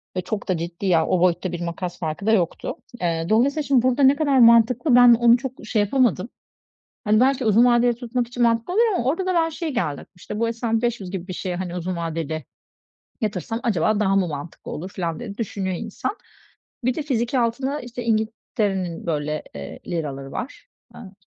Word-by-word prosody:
ve 185 - 0
çok 200 +3 -4
da 185 - +1
ciddi 170 +3 -5
ya, 170 -4 +3
o 185 - +2
boyutta 180 0 +1
bir 175 -1 -5
makas 175 +1 -4
farkı 160 +3 -4
da 220 - +3
yoktu. 180 -7 0 0.3
Eee, 165 -2 0
dolayısıyla 275 +7 +2
şimdi 275 -3 +3
burda 255 +3 +2
ne 270 +1 +6
kadar 285 -3 +2
mantıklı 235 +4 +5
ben 245 -1 +8
onu 235 +1 +5
çok 265 0 -5
şey 215 -1 +1
yapamadım. 225 -2 +1 0.7
Hani, 215 -1 +3
belki 260 0 +2
uzun 220 +3 +5
vadeli 240 0 +4
tutmak 240 0 -2
için 245 0 -2
mantıklı 230 +7 +1
oluyor 450 +1 +3
ama 245 - 0
orda 330 +8 0
da 370 - 0
ben 330 -1 +2
şeye 325 0 -4
geldim 160 - -2
işte 210 +4 -7
bu 230 - +2
hani 230 - -1
S&P 225 -1 -1
500 235 -6 -2
gibi 185 -2 -5
bir 185 - -5
şeye, 180 0 -4
hani, 180 -1 -4
uzun 180 +1 -3
vadeli 160 -3 -4 0.8
yatırsam 225 +1 -3
acaba 215 -2 +1
daha 195 -2 +2
mı 190 -3 +2
mantıklı 150 +1 -7
olur 180 +5 -6
filan 170 -4 -3
diye 205 -4 -7
düşünüyor 195 -4 -3
insan. 225 - -4 0.7
Bir 255 +1 +2
de 310 - -3
fiziki 255 -2 0
altınla, 260 +5 -1
işte, 245 0 -7
İngiltere'nin 215 -5 -1
böyle, 150 -1 -2
eee, 70 -1 -8
liraları 140 -5 -4
var, 265 - -6 0.3
ııı, 195 -5 -11
220 Hz, 200 wpm, -23 LUFS, 180-245 Hz, 0.8 s, ben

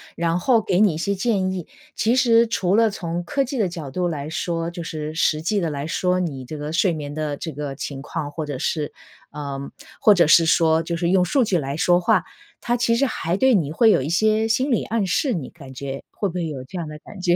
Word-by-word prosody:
然 165 0 0
后 230 +4 +3
给 190 -3 0
你 205 -6 +4
一 - - -5
些 200 +5 -1
建 195 -2 0
议。 180 -3 -5 0.3
其 230 +3 +2
实 235 -3 +5
除 190 -4 +1
了 225 0 +4
从 175 -3 -4
科 275 +11 0
技 270 +1 -4
的 205 -6 +1
角 165 -5 -7
度 175 +6 -1
来 150 -3 -4
说 165 +1 -2
就 170 0 -7
是 155 -1 -5
实 155 -1 +1
际 200 +5 0
地 165 - -1
来 145 0 -4
说， 180 +2 0
你 145 -8 -3
这 155 +5 -7
个 150 +1 -5
睡 180 +2 +3
眠 145 -2 -5
的 150 -1 -3
这 160 - -5
个 145 -1 -5
情 140 0 -6
况， 145 +1 -4
或 155 +1 -4
者 145 -3 -5
是 150 0 -2 0.4
呃， 140 -2 -5 0.4
或 215 -6 +7
者 175 -5 +4
是 165 +2 +6
说 160 -1 +3
就 170 +1 -3
是 170 0 0
用 185 0 +4
数 250 - +2
据 195 -4 +1
来 140 -2 -3
说 175 +1 +3
话， - - +3 0.4
它 240 - 0
其 235 -1 +2
实 275 - +3
还 175 -8 -2
对 265 +3 +4
你 155 -7 0
会 225 +8 +4
有 - - +3
一 135 - -3
些 215 +5 +2
心 255 +5 +1
理 235 - +2
暗 225 -3 -1
示， 260 - +1
你 155 -10 -4
感 140 -6 -13
觉 135 +1 -6
会 205 - -2
不 175 - -6
会 175 -2 -1
有 140 -4 -6
这 180 - -8
样 170 - -3
的 150 - -8
感 200 +4 -12
觉？ 175 -1 +3
170 Hz, 275 characters per minute, -22 LUFS, 150-200 Hz, 0.4 s, 或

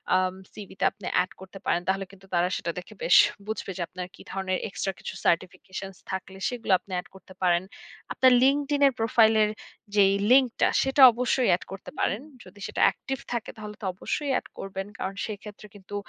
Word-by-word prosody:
আম 185 0 +2 0.2
CV 205 -3 -10
তে - - -1
আপনি 195 -1 -13
add 180 +1 +2
করতে 190 +1 -11
পারেন। 175 - +1
তাহলে 195 +1 0
কিন্তু 195 -1 -17
তারা 175 0 +3
সেটা 170 - -2
দেখে 180 - -12
বেশ - - +5 0.3
বুঝবে 220 -2 -4
যে - - -4
আপনার 180 -1 -7
কি - - -15
ধরনের 190 -1 -1
এক্সট্রা 195 -1 -3
কিছু - - -6
certifications 185 +2 -2
থাকলে 190 0 -5
সেগুলো 240 -4 -4
আপনি 200 - -17
অ্যাড 180 - -3
করতে 190 0 -14
পারেন। 175 -1 +3 0.5
আপনার 260 -1 +5
Linkedin 285 +1 +2
এর 270 - +1
প্রোফাইলের 220 -1 +4 0.5
যেই 195 -1 +5 0.2
লিঙ্ক 260 -1 +6
টা, - - +6
সেটা 270 +1 +2
অবশ্যই 250 +2 +1
অ্যাড 175 - +2
করতে 195 - -8
পারেন। 210 - 0 0.2
যদি 185 +3 -16
সেটা - - -3
অ্যাক্টিভ 270 - 0 0.2
থাকে 235 -2 -3
তাহলে 210 -1 -8
তো - - -5
অবশ্যই 280 +9 -3
অ্যাড - - 0
করবেন। 195 0 -5
কারণ 190 +1 -4
সেক্ষেত্রে 210 0 -8
কিন্তু 205 0 -10
195 Hz, 190 wpm, -26 LUFS, 185-225 Hz, 0.5 s, লিঙ্ক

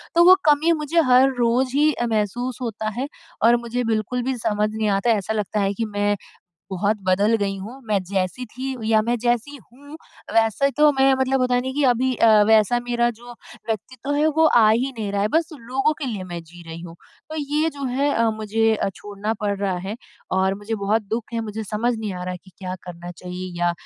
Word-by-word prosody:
तो 340 - +6
वो 370 - +10
कमी 300 +3 +4
मुझे 330 +3 +2
हर 255 +2 +6
रोज़ 250 +2 +1
ही 305 +1 +4
अ, 240 - -2
महसूस 230 +3 -2
होता 220 -3 -3
है 270 - -1 0.4
और 235 +2 +6
मुझे 245 +1 -2
बिल्कुल 220 +3 -2
भी 260 0 -2
समझ 210 -2 0
नहीं 220 -1 0
आता, 195 +4 +1
ऐसा 215 0 0
लगता 210 0 -2
है 200 0 +1
कि 225 +3 -2
मैं 205 -1 0 0.6
बहुत 200 +3 0
बदल 200 +4 +3
गई 200 -2 -2
हूँ। 225 +8 -9
मैं 210 -2 +2
जैसी 195 +5 -1
थी 255 +4 -6 0.2
या 220 -1 +5
मैं 235 +2 0
जैसी 240 +4 0
हूँ 280 - -14 0.4
वैसे 225 +5 +3
तो 300 0 +6
मैं 270 0 +4
मतलब 265 0 +1
होता 250 0 +2
है 245 - +3
ना 260 - -3
कि 290 +2 -1
अभी 255 +1 +2
अ, 230 - +3 0.2
वैसा 220 +2 +4
मेरा 240 0 +1
जो 240 +1 -12 0.3
व्यक्तित्व 245 +5 -4
है, 295 +2 +2
वो 315 +1 +3
आ 225 -7 +5
ही 250 +5 +1
नहीं 210 -2 -3
रहा 200 0 0
है 210 - +1
बस 325 0 +2
लोगों 270 +2 -1
के 300 - -4
लिए 210 -7 -4
मैं 175 -2 -6
जी 175 +1 -14
रही 165 +1 -7
हूँ। 170 -1 -10 0.3
तो 315 - -5
ये 300 +2 0
जो 280 -2 -7
है 270 +3 0
अ, 230 0 +2
मुझे 220 +1 +1
अ, 210 - -1
छोड़ना 205 +3 -4
पड़ 205 -1 -1
रहा 195 -2 -1
है 210 - -4 0.4
और 190 +1 +2
मुझे 205 +3 -4
बहुत 220 +2 +2
दुख 225 +1 -3
है। 230 - -1
मुझे 220 0 -5
समझ 225 +4 -1
नहीं 215 -3 -4
आ 180 - -6
रहा 180 - -3
है 180 - -7
कि 190 - -17
क्या 185 -1 -5
करना 175 -1 -8
चाहिए 180 +1 -7
या 175 0 +2
225 Hz, 225 wpm, -22 LUFS, 205-255 Hz, 0.6 s, वो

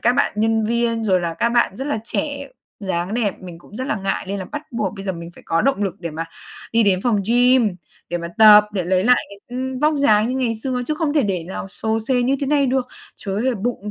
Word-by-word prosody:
các 240 - +3
bạn - - +1
nhân 220 0 +2
viên 230 0 0
rồi 185 -4 +3
là 170 -1 -3
các 235 - +1
bạn 235 -5 +2
rất 270 - -4
là 290 -7 -1
trẻ, 280 +3 -3 0.3
dáng 190 0 -2
đẹp, 215 -5 -1
mình 175 -2 -9
cũng 175 - -17
rất 260 - -3
là 220 - -1
ngại 195 -1 -2
lên 200 - -2
là 190 - -4
bắt 295 +10 -6
buộc 215 -5 -2
bây 195 - -7
giờ 190 - -1
mình 170 -1 -8
phải - - -15
có 165 - +1
động 270 -6 +1
lực 195 -3 -2
để 170 -2 -4
mà 160 +2 -4 0.5
đi 230 0 +4
đến 195 -3 +2
phòng 220 -5 +2
gym 245 -3 +4 0.3
để 175 - -1
mà 170 0 -5
tập, 210 -1 +9
để 185 -4 -1
lấy 185 +1 +1
lại 250 +2 +6
cái, 200 - -12 0.2
ừm, 260 0 -3
vóc 305 +2 +2
dáng 215 -4 +4
như 255 - -1
ngày 230 -2 0
xưa 255 -2 -1
chứ 305 - 0
không 305 -1 -1
thể 295 - +4
để 190 -6 -1
nào 190 +2 -6
xồ 220 +3 -2
xề 245 +2 +1
như 265 +3 +2
thế 280 - -1
này 285 -2 +3
được. 260 0 0 0.3
Trời 195 -1 -5
ơi, 210 - -1
là 240 - -2
bụng 220 -3 -2
220 Hz, 270 wpm, -21 LUFS, 195-250 Hz, 0.5 s, tập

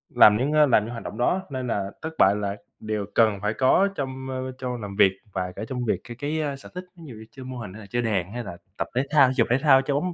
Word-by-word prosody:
làm 105 0 +7
những, 135 +5 0
a, 150 -1 +6
làm 120 -6 +4
những 115 - -6
hoạt 120 - -7
động 110 - -7
đó 180 +10 +1
nên 130 -2 -4
là 100 -3 -2
thất 160 0 -5
bại 100 +2 +5
là 100 -1 -2 0.2
đều 110 -1 -3
cần 110 -4 +3
phải 105 +1 0
có 135 - +3
trong, 130 -1 -5
ơ, 130 0 -4
trong 125 -2 -4
làm 100 -1 -6
việc 100 -2 +5 0.2
và 90 -1 -2
cả 105 - -5
trong 125 -2 -3
việc - - 0
cái 120 -1 -10
cái, 150 +3 -2
a, 145 -2 -2
sở 135 - -13
thích, 180 - -5
ví 170 - -13
dụ 125 - -9
như 110 +1 -11
chơi 130 -2 -11
mô 130 -1 -7
hình 105 -6 -7
hay 110 - -10
là 100 - -12
chơi 120 - 0
đàn 100 -5 -1
hay 120 0 -4
là 85 -6 -8 0.2
tập - - -2
thể 130 - +2
thao, 145 -3 +6
thể 130 - -1
dục, 115 - +3
thể 125 - +4
thao, 135 -1 +5
chơi 140 +1 -2
bóng 175 +4 -1
125 Hz, 310 wpm, -25 LUFS, 105-135 Hz, 0.2 s, làm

